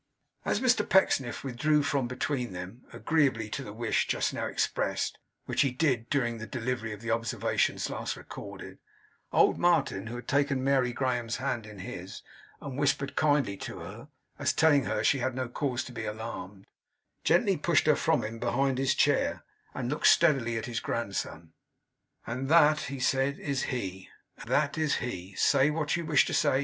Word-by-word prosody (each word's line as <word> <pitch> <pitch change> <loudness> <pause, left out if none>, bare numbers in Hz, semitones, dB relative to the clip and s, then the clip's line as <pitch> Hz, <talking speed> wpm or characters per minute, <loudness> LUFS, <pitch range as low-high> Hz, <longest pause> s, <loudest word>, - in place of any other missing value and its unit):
As - - +1
Mr 250 -3 +3
Pecksniff 135 -12 +2
withdrew 145 +4 +1
from 140 -3 0
between 125 -2 -2
them, 90 +7 -8
agreeably 135 -9 +1
to - - -3
the 105 - -8
wish 115 +2 0
just - - 0
now - - -2
expressed - - -1 0.3
(which - - +1
he 140 - +3
did 125 -3 0
during 120 -5 0
the 110 - -6
delivery 120 -2 -3
of 105 0 -8
the 115 -1 -3
observations 115 0 0
last - - -4
recorded), - - -9 0.5
old - - +4
Martin, 145 - +2
who 115 - -5
had 120 - -8
taken 140 -2 +1
Mary 135 -2 +2
Graham's 120 -2 -1
hand 125 -4 -3
in 105 -1 -11
his, 90 0 -8 0.4
and 140 -1 -6
whispered 140 -1 0
kindly 145 -9 +2
to - - -7
her, 100 +11 -9 0.3
as 145 -1 +1
telling 145 -3 +4
her 105 +2 -1
she 135 - +3
had 130 0 -1
no 130 -1 -2
cause 125 0 -2
to - - -9
be 115 -2 -5
alarmed, 105 -3 -6 0.6
gently - - +3
pushed - - +2
her - - +5
from - - +1
him, 115 +1 -5
behind 130 +2 0
his 135 -1 +2
chair; - - +2 0.3
and 125 0 -3
looked 150 - +2
steadily 135 -9 +4
at 110 - -3
his 120 -3 -3
grandson. 90 -7 -4 0.7
'And 130 +3 -4
that,' 155 -2 +5
he 135 -1 -5
said, 135 +2 +1
'is 140 -2 -2
he. 95 -7 -4 0.3
Ah! - - -9
that 145 +1 +1
is 155 -2 +2
he! 95 -5 -5
Say 140 0 +4
what 150 -1 0
you 170 -2 -3
wish 150 -4 +5
to - - -3
say. 130 - +3
125 Hz, 180 wpm, -29 LUFS, 115-140 Hz, 0.7 s, her